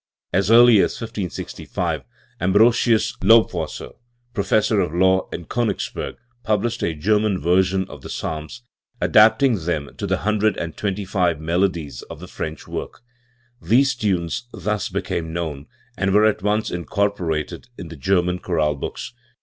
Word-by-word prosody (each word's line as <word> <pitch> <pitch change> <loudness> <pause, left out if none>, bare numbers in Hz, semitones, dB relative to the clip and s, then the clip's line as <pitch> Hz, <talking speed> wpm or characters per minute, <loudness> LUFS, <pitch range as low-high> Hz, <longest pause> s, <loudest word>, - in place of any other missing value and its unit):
As 95 +2 +2
early 120 0 +8
as - - +1
1565 100 - -4 0.4
Ambrosius 110 +4 +3
Lobwasser, 95 -6 +2 0.4
Professor 105 0 +2
of 85 -3 -1
Law 95 +1 +3
in 85 - -6
Konigsberg, 115 -2 -2 0.3
published 110 +3 0
a 80 - -1
German 105 +4 +1
version 95 +2 +2
of - - -11
the - - -9
Psalms, 80 +9 -5 0.4
adapting 110 +2 +4
them 80 -4 -2
to - - -3
the - - +1
hundred 105 +1 +1
and 80 -2 -4
twenty 100 -1 -3
five 90 -5 0
melodies 85 -5 -1
of - - -8
the - - -9
French 80 -1 -6
work, - - -6 0.6
These 135 +4 +3
tunes 100 -1 -2
thus 105 -1 -2
became 80 -1 -3
known, 75 -4 -4 0.3
and 95 +1 0
were 105 +1 +6
at 110 -3 +2
once 105 +2 0
incorporated 90 -3 -2
in 85 - -8
the 80 - -9
German 90 +3 +1
chorale 80 -5 0
books. 70 +10 -6
95 Hz, 140 wpm, -21 LUFS, 85-110 Hz, 0.6 s, early